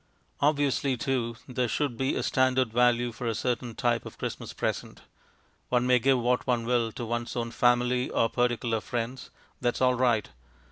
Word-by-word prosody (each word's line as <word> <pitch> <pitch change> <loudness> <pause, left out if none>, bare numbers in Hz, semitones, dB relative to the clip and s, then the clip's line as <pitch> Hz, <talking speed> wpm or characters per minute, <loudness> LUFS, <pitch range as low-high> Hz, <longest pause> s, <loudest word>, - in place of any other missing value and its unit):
Obviously, 140 -2 +1
too, 120 -2 -1
there 125 -1 -1
should 140 +1 -1
be 135 +3 0
a - - -1
standard 130 -2 +2
value 120 0 +3
for 115 +1 -5
a 115 - 0
certain 120 -1 -2
type 120 -2 +1
of - - -10
Christmas - - -5
present. - - -4 0.7
One 125 0 +2
may 125 0 +4
give 135 +2 +3
what 125 +2 0
one 120 -2 +1
will 120 -2 +1
to 120 - -5
one's 120 +1 -3
own 115 -1 -2
family 125 +1 +2
or 115 - +2
particular 120 -2 0
friends; 120 +3 -4 0.3
that 120 -1 0
is - - -5
all 125 0 +4
right. 120 -3 +2
125 Hz, 180 wpm, -28 LUFS, 120-125 Hz, 0.7 s, may